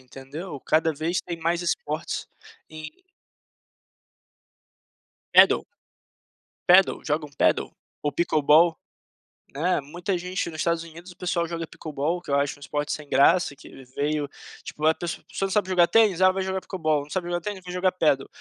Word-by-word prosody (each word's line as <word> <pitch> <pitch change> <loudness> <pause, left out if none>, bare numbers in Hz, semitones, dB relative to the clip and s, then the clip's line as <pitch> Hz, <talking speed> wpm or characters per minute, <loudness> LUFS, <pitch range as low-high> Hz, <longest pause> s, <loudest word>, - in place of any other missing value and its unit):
entendeu, 135 +5 -9
cada 160 +3 +2
vez 160 +4 -2
tem 170 -2 -5
mais 170 +2 0
esportes 485 - -3 0.4
em 155 - -10 2.3
Padel? - - +7 1.0
Padel, 185 +2 +6
jogam 150 0 -1
padel? - - +2 0.3
Ou 145 - 0
pickleball, 160 +1 +4 0.8
eh, 175 +5 +1
muita 175 +6 -3
gente 180 +1 -3
nos 160 -1 -9
Estados 170 0 0
Unidos, 170 +2 -12
o 175 - -17
pessoal 175 -2 -1
joga 165 0 -4
o - - -6
Pickleball, 155 +3 -3
que - - -13
eu 140 - +2
acho 140 +1 0
um - - -20
esporte 145 +1 -3
sem 150 -1 -7
graça, 145 +2 +4
que - - -15
ele 135 - -13
veio 145 +3 -2 0.3
tipo, 155 - -5
a 160 - +5
pessoa, 170 0 -6
você - - -3
não 195 - -4
sabe 205 -1 +1
jogar 175 -2 +4
tênis, 210 -5 +3
ah, 185 - +7
vai 190 0 -2
jogar 190 0 -2
Pickleball, 155 -7 -1
não 145 - -15
sabe 180 +1 -3
jogar 175 0 -1
tênis, 195 +1 -6
vou 180 - -8
jogar 180 +1 +1
Padel, 150 -6 +1
165 Hz, 175 wpm, -25 LUFS, 150-180 Hz, 2.3 s, Padel